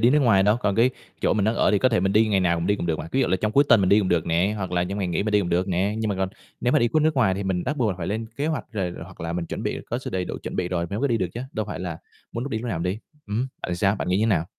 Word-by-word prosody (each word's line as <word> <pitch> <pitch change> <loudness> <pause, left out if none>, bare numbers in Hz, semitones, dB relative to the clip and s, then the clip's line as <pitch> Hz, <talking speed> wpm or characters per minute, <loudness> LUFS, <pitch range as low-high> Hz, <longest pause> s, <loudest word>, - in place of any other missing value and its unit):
đi 120 - +5
nước 150 - +4
ngoài 110 -8 +4
đâu. 105 +3 +4
Còn 105 -5 0
cái 120 +3 +4 0.3
chỗ - - +2
mình 105 -1 +1
đang 110 +2 +2
ở - - +3
thì 105 - +3
có 130 - +4
thể 115 -5 +1
mình 95 +1 +1
đi 110 +2 +4
ngày 100 -2 +2
nào 85 -2 +1
mình 85 - -2
đi 100 - +2
cũng 85 - -3
được 80 -2 0
mà. 80 - -6
Ví 135 - +2
dụ - - +3
là 95 - +2
trong 105 +3 -1
cuối 140 +4 +5
tuần 110 - +6
mình 95 - +2
đi 100 - +6
cũng 95 - +1
được 85 -3 +1
nè, 85 +5 +1
hoặc 95 -3 -4
là 90 0 +1
trong 100 +3 -4
ngày 95 -3 -1
nghỉ 85 +2 0
mình 105 0 -2
đi 105 - +5
cũng 90 - -2
được 90 +2 +1
nè, 95 +3 0
nhưng 110 -1 -1
mà 100 - 0
còn 95 0 -1 0.3
nếu 125 - +1
mà - - +5
đi 120 - +2
cuốc 155 +5 +2
nước 155 0 +2
ngoài 120 -9 +3
thì 100 - -3
mình 95 -2 -1
bắt 145 +4 -2
buộc 120 -6 +1
là - - -2
phải 85 - -3
lên 110 +4 -2
kế 145 - -1
hoạch, 155 -7 -1
rồi 95 -5 -2
hoặc 95 +2 -14
là 85 0 -3
mình 85 -1 -3
chuẩn - - -5
bị - - -2
có 120 - 0
sự 130 - -6
đầy 95 -1 -1
đủ - - -5
chuẩn - - -5
bị 90 -1 -1
rồi 85 -2 -1
mới 100 - -2
mới 140 - +1
đi 120 - +2
được 90 - -1
chứ, 120 - -4
đâu 110 -1 -2
phải 105 - -5
là 85 -3 -4 0.3
muốn 115 - -3
lúc 140 - -5
đi 110 - -1
lúc 120 +2 -5
nào 95 - -2
mình 90 +2 -1
đi. 105 - -7 0.3
Ừm, 110 +5 -1 0.2
bạn 90 - -2
sao? 100 +3 +2
Bạn - - -3
nghĩ 90 - +2
như 105 - +1
thế - - +3
nào? 90 -8 +2
100 Hz, 400 wpm, -24 LUFS, 90-115 Hz, 0.3 s, tuần